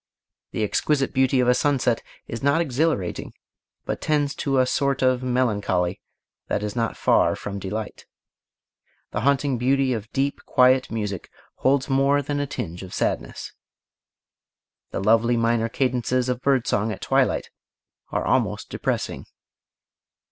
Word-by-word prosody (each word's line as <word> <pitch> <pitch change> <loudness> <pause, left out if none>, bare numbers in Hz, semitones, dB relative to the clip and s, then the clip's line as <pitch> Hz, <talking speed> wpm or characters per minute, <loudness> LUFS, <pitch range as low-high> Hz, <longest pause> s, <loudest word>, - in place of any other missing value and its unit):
The 110 - -2
exquisite 135 +6 +1
beauty 130 -1 +3
of 125 - +1
a 125 - +6
sunset 130 -3 +1 0.2
is 115 - -6
not 140 +3 +3
exhilarating 150 - -1 0.5
but - - -3
tends 145 -2 +1
to 135 -1 0
a 130 - +5
sort 135 +1 0
of 130 -1 +3
melancholy 105 -8 0 0.5
that 105 - -1
is 105 -1 -3
not 115 -2 -1
far - - +3
from 100 -1 -6
delight 105 +3 -5 1.0
The 105 - -2
haunting 140 -1 +1
beauty 135 +1 +2
of 110 -1 -5
deep, 140 +1 -1
quiet 130 +1 +4
music 105 -5 -4 0.3
holds 135 0 +2
more 140 +1 +2
than 145 +1 -2
a 145 - -1
tinge 90 -9 -5
of 95 -1 -8
sadness. - - -2 1.4
The - - -4
lovely 115 +3 +3
minor 115 0 +1
cadences 125 0 0
of 125 0 -2
bird 135 -3 +2
song 105 +2 0
at 95 - -7
twilight - - +1 0.6
are - - -2
almost - - 0
depressing. - - -3
125 Hz, 140 wpm, -24 LUFS, 110-135 Hz, 1.4 s, a